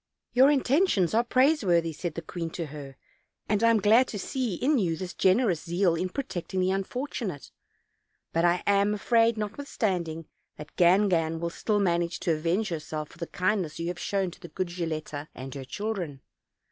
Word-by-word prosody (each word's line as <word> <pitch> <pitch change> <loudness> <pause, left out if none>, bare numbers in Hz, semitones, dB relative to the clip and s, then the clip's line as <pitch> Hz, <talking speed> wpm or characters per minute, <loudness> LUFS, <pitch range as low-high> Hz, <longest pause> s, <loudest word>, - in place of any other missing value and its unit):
"Your 260 +3 +6
intentions 270 - +2
are 230 +2 +4
praiseworthy," 235 - +2
said 165 +1 -5
the 165 - -5
queen 170 -2 -5
to 170 - -2
her, 140 -3 -9 0.5
"and 210 +1 +1
I 230 - +6
am 230 -1 +4
glad 225 +6 +5
to 210 - -5
see 235 0 -2
in 275 - +2
you 170 -5 0
this 180 +1 -6
generous 190 -4 +2
zeal 175 +1 +1
in 180 +3 -1
protecting 190 -6 -4
the 185 +1 +2
un 195 0 0
fortunate; 235 - -5 0.8
but 165 - +2
I 175 0 +2
am 200 +1 +3
afraid, 230 +2 +3
notwithstanding, 200 - -2 0.3
that 150 0 -11
Gangan 175 -3 +3
will 170 0 -2
still 210 +4 0
manage 175 -3 0
to 170 - +1
avenge 170 +7 0
herself 155 -2 -4
for - - -17
the 170 - -4
kindness 185 -4 -1
you 170 +1 -3
have 175 0 -5
shown 195 -3 -1
to - - -15
the - - -9
good 185 0 -3
Gilletta 155 -4 -4
and 130 +1 -7
her 135 -2 -7
children. 180 -4 -4
185 Hz, 185 wpm, -27 LUFS, 165-215 Hz, 0.8 s, Your